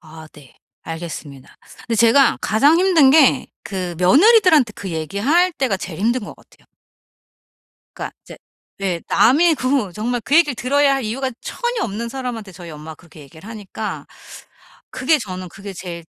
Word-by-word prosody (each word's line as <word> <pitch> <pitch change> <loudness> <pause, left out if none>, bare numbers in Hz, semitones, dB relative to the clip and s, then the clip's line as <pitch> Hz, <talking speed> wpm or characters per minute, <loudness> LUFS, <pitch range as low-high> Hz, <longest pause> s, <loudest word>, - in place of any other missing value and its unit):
아 160 -1 -13
네. 140 -4 -17 0.3
알겠습니다. 160 -5 -8 0.4
근데 230 - 0
제가 235 +5 +4
가장 285 +10 +3
힘든 345 -8 +4
게 295 -3 +4 0.2
그 180 -4 -4
며느리들한테 310 - +5
그 195 - -6
얘기할 215 - +1
때가 265 - -1
제일 180 -3 -8
힘든 235 +5 0
것 - - -9
같아요. - - -25 1.3
그러니까 - - -6
이제 - - -13 0.4
예 180 -3 -2
남이 315 +7 +4
그 255 -8 -1
정말 235 +4 -3
그 290 - +2
얘기를 295 -6 +3
들어야 275 +3 +2
할 270 -3 -3
이유가 260 +4 -3
전혀 480 -2 -3
없는 225 +3 -4
사람한테 240 -6 -6
저희 175 -2 -11
엄마가 155 +1 -10
그렇게 160 -3 -17
얘기를 160 +8 -14
하니까 215 -1 -7 0.8
그게 290 +4 +1
저는 185 -5 -7
그게 195 +3 -10
제일 170 -2 -8
225 Hz, 335 characters per minute, -19 LUFS, 180-275 Hz, 1.3 s, 며느리들한테